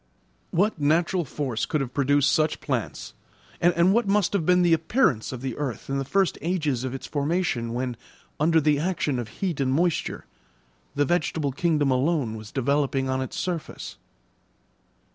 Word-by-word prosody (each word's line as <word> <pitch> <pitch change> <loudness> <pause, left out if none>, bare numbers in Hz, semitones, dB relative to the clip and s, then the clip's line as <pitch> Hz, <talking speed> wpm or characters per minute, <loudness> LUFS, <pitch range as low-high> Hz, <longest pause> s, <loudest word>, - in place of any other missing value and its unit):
What 190 -2 +1
natural 170 +4 +2
force 130 -4 -3
could 155 - 0
have 130 -3 -4
produced 145 0 +3
such 155 -2 +1
plants, - - -3 0.5
and 175 +2 +4
what 235 -1 +2
must 200 -1 +2
have 180 -6 0
been 180 0 +5
the 170 -1 +4
appearance 160 - +1
of 130 -2 -6
the 130 -3 -3
earth 135 -2 -4
in 135 - 0
the - - -1
first 190 +7 +1
ages 155 -8 -1
of 130 0 -3
its 135 - -7
formation, 145 -5 -1
when, 125 -1 -2 0.4
under 160 +2 +4
the 150 -1 +2
action 155 -6 -1
of 120 - -4
heat 170 - -3
and 130 -1 +1
moisture, 170 +4 0 0.7
the 145 0 +2
vegetable 155 -2 0
kingdom 150 -1 +1
alone 130 -3 +1
was 110 -1 -9
developing 135 0 0
on 130 0 0
its 130 - -5
surface? 175 -4 -4
145 Hz, 165 wpm, -25 LUFS, 130-170 Hz, 0.7 s, been